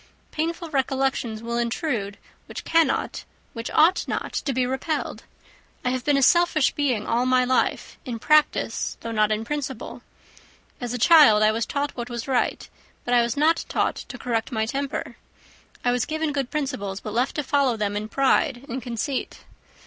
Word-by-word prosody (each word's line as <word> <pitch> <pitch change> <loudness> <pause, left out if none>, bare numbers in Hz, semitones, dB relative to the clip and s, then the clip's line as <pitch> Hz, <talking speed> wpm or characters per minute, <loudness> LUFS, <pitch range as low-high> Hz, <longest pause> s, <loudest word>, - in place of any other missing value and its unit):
Painful 330 +1 -3
recollections 265 -5 -1
will 235 +1 -2
intrude, 235 - -2 0.3
which - - -7
cannot, 330 -1 +1 0.3
which 230 0 -5
ought 340 +4 +3
not - - -3
to 280 - -1
be 255 -1 +1
repelled. 265 +5 -3 0.6
I 250 - +2
have 255 -1 -2
been 290 0 +2
a 275 - +2
selfish 340 -2 +4
being 255 -8 0
all 240 +2 +1
my 255 0 +3
life, 255 +1 0
in 245 -4 -5
practice, 305 +6 +2
though 230 - -5
not 215 -1 +2
in 215 +1 -1
principle. 270 -3 -5 0.8
As 245 -2 -4
a - - -1
child 245 -6 +7
I 215 - +5
was 225 +1 -2
taught 285 0 -2
what 240 -1 -5
was 235 0 -5
right, 260 -2 0 0.4
but 245 - 0
I 240 - +6
was 235 +2 -1
not 320 +3 +3
taught - - 0
to - - -8
correct 230 0 -2
my 220 -2 0
temper. 275 +4 -4 0.7
I 245 - +4
was 245 -1 0
given 315 -1 -1
good 275 -3 -2
principles, 255 -10 -3
but 215 - -7
left 245 +3 0
to 295 - -1
follow 270 -3 +1
them 205 -1 -1
in 210 +1 -3
pride 270 0 +1
and 255 +2 -4
conceit. 245 +3 -4
255 Hz, 180 wpm, -24 LUFS, 230-290 Hz, 0.8 s, child